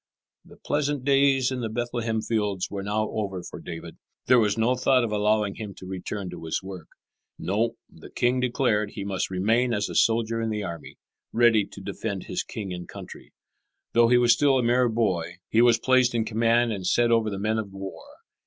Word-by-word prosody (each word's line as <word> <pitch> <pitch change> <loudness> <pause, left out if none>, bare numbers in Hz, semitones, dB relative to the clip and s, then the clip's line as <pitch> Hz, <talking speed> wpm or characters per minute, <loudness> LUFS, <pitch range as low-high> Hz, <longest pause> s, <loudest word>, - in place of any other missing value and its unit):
The - - -17
pleasant 145 -2 -1
days 135 -2 +3
in 130 - -3
the 115 - -2
Bethlehem 115 -1 -2
fields 105 -5 -1
were 100 -1 -4
now 105 +2 -1
over 95 -4 -3
for 90 - -9
David. 85 -1 -8 0.3
There 125 - +5
was 105 -1 +1
no 115 +3 +2
thought 130 0 +3
of 115 - -2
allowing 105 -1 +1
him 105 -4 -7
to - - -11
return 95 +1 -5
to - - -9
his 80 - -2
work. 95 -4 -8 0.5
No, 105 +5 -1
the - - -14
king 125 +1 +1
declared 120 -4 0
he 100 - -5
must 95 -2 -2
remain 115 +6 +1
as 105 0 -1
a - - -6
soldier 115 0 +2
in 115 - -1
the 105 -1 -2
army, 85 -4 -7 0.3
ready 115 -3 +4
to 100 - -11
defend 100 0 -4
his - - -3
king 100 -4 -6
and 90 -1 -7
country. - - -11 0.6
Though 120 0 +5
he 125 +1 +5
was 120 -1 +5
still 135 +2 +3
a 125 - +1
mere 120 +1 +3
boy 95 -7 -1 0.2
he 115 - +4
was 120 -1 +5
placed 130 -2 +3
in 115 -1 +1
command 115 +1 +2
and 95 -3 -4
set 120 +3 +3
over 115 -2 +3
the 100 - -4
men 110 +2 0
of 100 -3 -5
war. 95 0 -8
110 Hz, 205 wpm, -25 LUFS, 100-120 Hz, 0.6 s, There